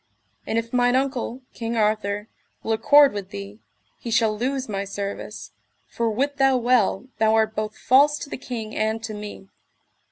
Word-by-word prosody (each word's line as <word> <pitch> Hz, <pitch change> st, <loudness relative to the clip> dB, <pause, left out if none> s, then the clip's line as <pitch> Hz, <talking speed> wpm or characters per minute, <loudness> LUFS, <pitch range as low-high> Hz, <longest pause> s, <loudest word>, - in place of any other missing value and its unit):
And 225 Hz, -, -1 dB
if 230 Hz, +1 st, -3 dB
mine 245 Hz, 0 st, +3 dB
uncle, 260 Hz, -1 st, -1 dB
King 230 Hz, 0 st, -4 dB
Arthur, 210 Hz, -1 st, 0 dB, 0.4 s
will 225 Hz, -, -2 dB
accord 285 Hz, +5 st, +6 dB
with 200 Hz, -2 st, -5 dB
thee, 100 Hz, +1 st, -8 dB, 0.4 s
he 235 Hz, -, -6 dB
shall 220 Hz, -1 st, +2 dB
lose 260 Hz, +4 st, -2 dB
my 200 Hz, -2 st, -2 dB
service, 200 Hz, 0 st, -6 dB, 0.3 s
for 230 Hz, -1 st, -2 dB
wit 275 Hz, +6 st, -1 dB
thou 270 Hz, -1 st, +4 dB
well 240 Hz, -3 st, +2 dB
thou 220 Hz, 0 st, +4 dB
art 220 Hz, 0 st, +2 dB
both 215 Hz, 0 st, -3 dB
false 285 Hz, +3 st, +4 dB
to 285 Hz, -, -8 dB
the -, -, -4 dB
king 225 Hz, -4 st, -6 dB
and 220 Hz, +1 st, -1 dB
to 220 Hz, -1 st, -4 dB
me. 210 Hz, -2 st, -8 dB
225 Hz, 170 wpm, -23 LUFS, 210-255 Hz, 0.4 s, accord